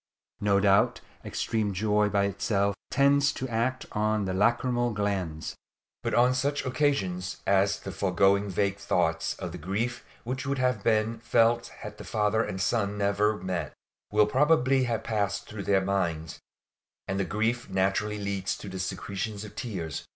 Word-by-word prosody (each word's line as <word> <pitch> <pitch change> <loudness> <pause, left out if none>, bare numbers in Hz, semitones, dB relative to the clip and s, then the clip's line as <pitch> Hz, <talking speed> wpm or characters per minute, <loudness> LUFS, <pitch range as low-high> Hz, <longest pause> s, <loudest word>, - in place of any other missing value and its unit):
No 100 -1 +3
doubt 100 0 +3 0.2
extreme 110 -4 -1
joy 105 +1 +2
by 100 -1 +2
itself 100 0 0 0.2
tends 140 +1 +4
to 130 - -4
act 120 +2 -1
on 105 -1 0
the 95 - -2
lacrymal 120 +3 +1
glands; 95 -6 -2 0.5
but - - -1
on 125 +1 +5
such 140 +3 -1
occasions 105 -10 0
as 100 +1 +3
the 95 - -6
foregoing 100 +2 +2
vague 100 +1 0
thoughts 80 -4 0
of 90 -3 -6
the 90 - -7
grief 105 +8 -2 0.2
which 130 +2 -3
would 140 0 -1
have 125 -5 0
been 110 0 +1
felt 115 +1 +2
had 105 0 -10
the - - -7
father 110 0 +1
and 95 - -4
son 100 +1 0
never 105 +1 +2
met, 90 -3 -3 0.4
will 105 0 +5
probably 135 +1 +3
have 115 -2 -2
passed 100 -2 -1
through 105 -2 -7
their 95 -1 +3
minds; 85 -5 -1 0.7
and 95 0 -1
grief 115 +3 -1
naturally 95 +2 0
leads 100 -2 -2
to 100 - -8
the 95 0 -6
secretion 100 +3 -3
of 105 - -12
tears. 90 - -5
105 Hz, 160 wpm, -28 LUFS, 95-115 Hz, 0.7 s, on